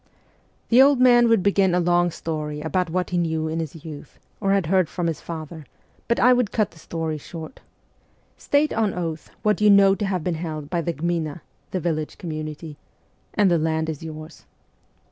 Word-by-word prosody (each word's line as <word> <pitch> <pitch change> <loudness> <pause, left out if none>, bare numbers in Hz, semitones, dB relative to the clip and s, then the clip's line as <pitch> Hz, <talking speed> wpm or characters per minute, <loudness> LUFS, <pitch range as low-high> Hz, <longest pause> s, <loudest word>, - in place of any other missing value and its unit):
The 245 +2 +7
old 275 -1 +5
man 240 -1 +6
would 225 -5 +3
begin 195 -2 +3
a - - +3
long 175 0 +2
story 155 -2 -4
about 165 +3 -1
what 180 +2 -2
he 175 - +1
knew 160 -2 -1
in 160 +1 -2
his 160 0 -6
youth, 150 -2 -10 0.2
or 195 -1 +1
had 195 -3 +2
heard 185 0 +2
from 175 - -3
his 165 -3 -2
father, 160 -3 -8 0.4
but 235 - +1
I 250 +1 +6
would 245 -4 +1
cut 215 -3 0
the 165 - -17
story 160 -1 -4
short.... 160 - -9 0.4
" - - -38 0.3
State 290 +1 +1
on 220 -3 0
oath 165 -3 -4
what 210 0 +1
you 210 - +6
know 200 -1 +6
to 205 +1 -2
have 185 -4 -2
been 180 - -1
held 155 -3 -5
by 175 -2 0
the 170 +1 -2
gmina 165 0 -2 0.3
(the 185 - -2
village 155 -2 -3
community) 155 -2 -6 0.6
and 200 -3 +4
the 170 - +3
land 160 0 0
is 155 -3 -5
yours." 155 0 -9
170 Hz, 200 wpm, -23 LUFS, 155-195 Hz, 0.6 s, The